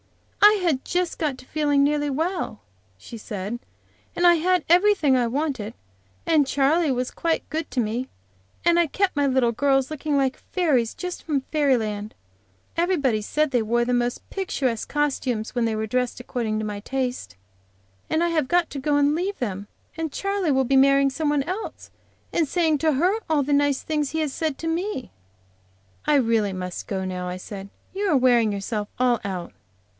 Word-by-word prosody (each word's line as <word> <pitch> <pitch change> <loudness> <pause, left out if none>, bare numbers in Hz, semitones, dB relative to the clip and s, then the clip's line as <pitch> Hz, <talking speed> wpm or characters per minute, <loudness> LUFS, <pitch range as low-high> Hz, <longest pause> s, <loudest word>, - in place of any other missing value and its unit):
"I 415 +1 +9
had 300 -7 +1
just 355 -1 -1
got 295 -5 -1
to 255 - -14
feeling 290 -1 +2
nearly 295 0 +1
well," 320 - -2 0.4
she 170 - -10
said, 210 +1 -5 0.6
"and 350 - +1
I 345 - +8
had 360 +1 +2
everything 350 -5 +4
I 245 -2 +2
wanted, 255 -4 -2 0.5
and 310 -3 +4
Charley 285 +3 +2
was 250 0 -1
quite 330 -1 -1
good 315 0 -3
to 255 - -1
me, 235 +3 -1 0.6
and 345 0 +5
I 340 - +3
kept 390 +4 0
my 285 0 +2
little 255 -3 +2
girls 270 +3 +1
looking 300 -1 -1
like 270 -1 +1
fairies, 280 - 0
just 360 -1 -5
from 290 -4 0
fairy 285 -4 +3
land. 210 -1 -4 0.6
Everybody 295 - +1
said 305 +8 0
they 245 -3 +2
wore 235 +2 +1
the 250 - 0
most 245 0 -1
picturesque 270 - -2
costumes 265 -6 -1
when 240 -2 +1
they 225 -1 0
were 220 0 -2
dressed 250 +2 -1
according 235 -3 -2
to 215 - -3
my 205 -1 -4
taste. 255 - -3 0.7
And 320 +2 +1
I 345 - +2
have 310 -5 +1
got 350 +2 +2
to 280 - -4
go 290 +2 +1
and 290 0 +3
leave 385 +4 -2
them, 200 -4 -4 0.3
and 320 -2 -3
Charley 395 -3 -1
will 265 -1 +3
be 270 +2 +1
marrying 275 0 +5
somebody 295 -1 0
else, 375 +5 -6 0.4
and 325 -3 +2
saying 320 -1 +1
to 315 0 +2
her 360 +10 +2
all 300 -3 +3
the 285 +2 0
nice 285 -1 +2
things 300 -3 -1
he 320 - -2
has 300 -4 -1
said 310 -4 -2
to 325 - -4
me." 335 -3 -2 0.9
"I - - +3
really 225 -6 +2
must 180 -1 -5
go 190 -2 -2
now," 180 -1 -4
I 180 - -4
said. 195 +1 -8 0.2
"You 400 +1 -1
are 295 - +4
wearing 240 -4 +4
yourself 205 +1 -3
all 245 -2 +3
out." 185 -3 -5
275 Hz, 190 wpm, -24 LUFS, 235-320 Hz, 0.9 s, I